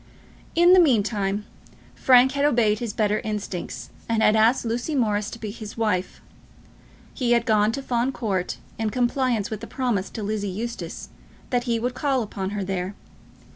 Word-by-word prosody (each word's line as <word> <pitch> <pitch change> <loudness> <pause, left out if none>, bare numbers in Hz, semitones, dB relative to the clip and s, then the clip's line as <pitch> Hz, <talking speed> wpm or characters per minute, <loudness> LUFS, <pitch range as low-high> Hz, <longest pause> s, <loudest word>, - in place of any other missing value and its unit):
In 345 +2 +6
the 370 - +8
meantime 210 - +2 0.5
Frank 255 0 +5
had 280 +1 -1
obeyed 230 -7 +3
his 235 -3 -3
better 210 0 +1
instincts, 205 -4 -5 0.2
and 225 -1 +2
had 215 - +5
asked 225 +3 +3
Lucy 240 +7 -2
Morris 210 -5 +1
to - - -8
be 215 -3 -5
his 215 -1 -9
wife. 210 -5 -1 0.9
He 245 -3 +1
had 235 -1 +2
gone 215 -2 +3
to 275 - -4
Fawn 245 0 0
Court 195 -8 -2 0.2
in 220 -1 0
compliance 245 -2 0
with 215 - -5
a - - -5
promise 235 -8 -1
to 220 - -6
Lizzie 205 -1 -2
Eustace, 230 +5 -5 0.4
that 245 -1 +1
he 235 -2 0
would 245 +2 -2
call 265 -1 0
upon 195 -2 -4
her 205 -1 -3
there. 190 +1 -3
225 Hz, 175 wpm, -24 LUFS, 205-245 Hz, 0.9 s, the